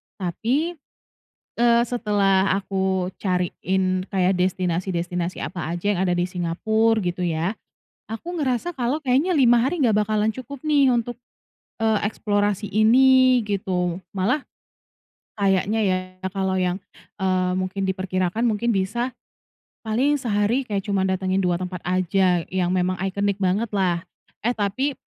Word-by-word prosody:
tapi, 240 Hz, -, -1 dB, 0.9 s
eee, 235 Hz, 0 st, +5 dB
setelah 200 Hz, -5 st, +2 dB
aku 190 Hz, -1 st, -1 dB
cariin 185 Hz, 0 st, -1 dB
kayak 190 Hz, -1 st, +2 dB
destinasi-destinasi 180 Hz, -1 st, -1 dB
apa 175 Hz, -3 st, -5 dB
aja 175 Hz, +2 st, -5 dB
yang -, -, -2 dB
ada -, -, +2 dB
di 175 Hz, -, +1 dB
Singapura 220 Hz, +6 st, +1 dB
gitu 180 Hz, +1 st, -2 dB
ya, 170 Hz, +5 st, -1 dB, 0.6 s
aku 340 Hz, +11 st, -5 dB
ngerasa 295 Hz, +2 st, -1 dB
kalau 255 Hz, +3 st, -1 dB
kayaknya 275 Hz, +6 st, +2 dB
5 245 Hz, -6 st, +5 dB
hari 305 Hz, +7 st, -1 dB
gak 230 Hz, -5 st, +3 dB
bakalan 215 Hz, 0 st, +1 dB
cukup 260 Hz, +2 st, -8 dB
nih 290 Hz, -4 st, +3 dB
untuk, 240 Hz, 0 st, -1 dB, 0.7 s
eee, 220 Hz, -1 st, +2 dB
eksplorasi 205 Hz, -1 st, 0 dB
ini 255 Hz, +4 st, +5 dB
gitu. 180 Hz, -4 st, -1 dB, 0.2 s
Malah 215 Hz, +9 st, 0 dB, 0.9 s
kayaknya 200 Hz, +2 st, +1 dB
ya 185 Hz, -3 st, +2 dB, 0.3 s
kalau 190 Hz, -1 st, -1 dB
yang, 180 Hz, -1 st, 0 dB, 0.4 s
eee, 185 Hz, -1 st, +1 dB
mungkin 185 Hz, +1 st, -3 dB
diperkirakan 190 Hz, +3 st, -1 dB
mungkin 230 Hz, +1 st, +1 dB
bisa 215 Hz, +5 st, -1 dB, 0.8 s
paling 265 Hz, +7 st, +2 dB
sehari 230 Hz, +1 st, 0 dB
kayak 200 Hz, -3 st, -2 dB
cuma 195 Hz, -1 st, +1 dB
datangin 190 Hz, 0 st, 0 dB
2 180 Hz, -2 st, +1 dB
tempat 180 Hz, +1 st, -4 dB
aja 185 Hz, 0 st, +2 dB
yang 185 Hz, -1 st, 0 dB
memang 185 Hz, 0 st, 0 dB
iconic 200 Hz, +1 st, -1 dB
bangetlah. 190 Hz, -3 st, 0 dB, 0.4 s
Eh, 230 Hz, -, +1 dB
tapi 235 Hz, +7 st, -1 dB
195 Hz, 130 wpm, -23 LUFS, 185-235 Hz, 0.9 s, eee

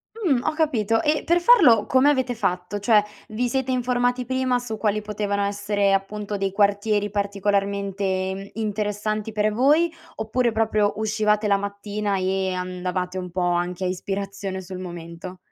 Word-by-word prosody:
Mh, 345 Hz, -, +1 dB
ho -, -, 0 dB
capito. 225 Hz, -9 st, +1 dB
E 300 Hz, 0 st, +1 dB
per 345 Hz, +1 st, +3 dB
farlo 315 Hz, -, +6 dB
come 260 Hz, +2 st, +4 dB
avete 260 Hz, -3 st, 0 dB
fatto? 180 Hz, -2 st, -2 dB
Cioè 210 Hz, 0 st, +4 dB, 0.3 s
vi 235 Hz, +3 st, -1 dB
siete 265 Hz, +1 st, -1 dB
informati 245 Hz, 0 st, 0 dB
prima 260 Hz, 0 st, +1 dB
su 245 Hz, -3 st, -5 dB
quali 215 Hz, -1 st, 0 dB
potevano 205 Hz, -1 st, -2 dB
essere 200 Hz, 0 st, 0 dB
appunto 205 Hz, +1 st, -2 dB
dei 195 Hz, -1 st, -1 dB
quartieri 205 Hz, +1 st, +1 dB
particolarmente 200 Hz, -1 st, -1 dB
interessanti 215 Hz, 0 st, -2 dB
per 210 Hz, 0 st, +1 dB
voi, 295 Hz, +9 st, +3 dB, 0.2 s
oppure 235 Hz, +3 st, 0 dB
proprio 215 Hz, -2 st, +1 dB
uscivate 215 Hz, 0 st, +1 dB
la 200 Hz, -1 st, +4 dB
mattina 200 Hz, 0 st, -3 dB
e 190 Hz, 0 st, 0 dB
andavate 180 Hz, 0 st, -3 dB
un 180 Hz, -1 st, -5 dB
po' 180 Hz, +2 st, -3 dB
anche 175 Hz, +1 st, 0 dB
a -, -, +1 dB
ispirazione 195 Hz, +1 st, -4 dB
sul 185 Hz, 0 st, -8 dB
momento? 175 Hz, 0 st, -8 dB
205 Hz, 150 wpm, -23 LUFS, 195-225 Hz, 0.3 s, farlo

